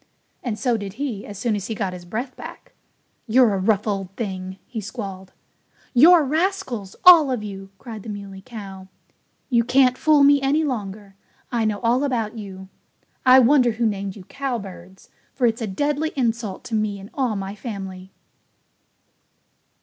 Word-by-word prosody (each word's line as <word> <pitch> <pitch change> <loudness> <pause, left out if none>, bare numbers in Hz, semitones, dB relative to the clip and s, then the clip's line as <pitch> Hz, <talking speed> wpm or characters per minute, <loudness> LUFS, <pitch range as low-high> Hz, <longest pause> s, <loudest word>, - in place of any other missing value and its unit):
And 230 -4 -3
so 245 -2 +1
did 200 -3 -6
he 235 -4 -4
as 205 - -8
soon 220 +1 0
as 200 -2 -4
he 225 - -3
got 195 -3 -2
his 180 -1 -9
breath 240 +8 -4
back. - - -11 0.5
"You're 235 -1 +5
a 195 - 0
rough 200 +1 +1
old 195 -3 -2
thing!" 190 -4 -5
he 230 -4 -6
squalled. 195 -3 -7 0.6
"You're 320 +6 +7
rascals 285 - -2
all 335 -6 +9
of 250 -5 -2
you!" 195 -2 -7
cried 220 -1 -9
the 220 - -9
Muley 200 -2 -7
Cow. 195 -5 -9 0.6
"You 235 -1 +4
can't 255 +1 +3
fool 305 -2 +5
me 285 0 +6
any 285 +4 +2
longer. 205 -7 -4 0.4
I 235 -2 0
know 210 -1 0
all 245 +3 +2
about 235 -6 -1
you. 190 -3 -8 0.6
I 255 +1 +9
wonder 255 -1 +5
who 230 +2 -1
named 200 -3 -2
you 200 - -11
cowbirds, 195 -8 -6 0.2
for 255 - +1
it's 230 0 +1
a 225 - -2
deadly 290 +10 -1
insult 230 -6 -2
to 235 - -9
me 215 -2 0
and 195 +2 -12
all 250 -5 0
my 195 0 -4
family." 195 -3 -7
220 Hz, 170 wpm, -22 LUFS, 195-255 Hz, 0.6 s, all